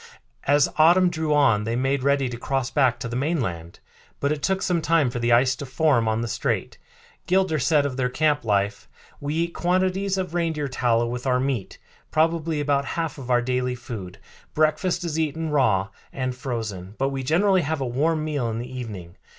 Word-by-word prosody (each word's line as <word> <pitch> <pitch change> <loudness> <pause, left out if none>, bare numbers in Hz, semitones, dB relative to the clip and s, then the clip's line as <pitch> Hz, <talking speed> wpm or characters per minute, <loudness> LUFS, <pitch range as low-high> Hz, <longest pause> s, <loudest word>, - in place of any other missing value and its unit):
As 145 0 +4
autumn 175 +3 +5
drew 160 -2 -2
on 140 -8 +4
they 115 +2 -2
made 135 +2 0
ready 140 0 +2
to 125 - -5
cross 135 +1 -2
back 130 -5 +2
to 125 - -3
the 115 - -5
mainland; 120 - -2 0.4
but 140 - 0
it 150 -1 -2
took 190 +5 0
some 175 -2 +1
time 155 -5 +2
for 120 - -4
the 120 0 +1
ice 130 +2 +4
to - - -6
form 135 -4 +2
on 110 +1 0
the 120 - -2
strait. - - -2 0.5
Gilder 185 -4 +2
said 145 +2 +3
of 135 -2 -3
their 125 -1 0
camp 150 +1 +1
life: 100 -2 -1 0.3
"We 145 +2 -3
eat 170 +1 -1
quantities 185 +2 0
of 185 -3 -3
reindeer 165 -4 -1
tallow 120 -3 +1
with 125 +2 -4
our 125 -1 +2
meat, 130 -7 -2 0.3
probably 160 0 +1
about 140 -1 +1
half 165 0 -3
of 130 -2 -8
our 120 -1 +3
daily 125 0 -1
food. 100 -7 -8 0.4
Breakfast 155 +4 +1
is 160 -2 -2
eaten 160 0 -2
raw 105 -9 +2 0.2
and 130 -1 -3
frozen, 110 -7 -5
but 135 +1 +1
we 135 -1 -3
generally 185 +8 +3
have 160 0 -2
a 135 - -1
warm 155 +6 0
meal 145 -6 -1
in 110 - -3
the 125 +2 -6
evening. 100 -9 -7
135 Hz, 200 wpm, -24 LUFS, 120-160 Hz, 0.5 s, autumn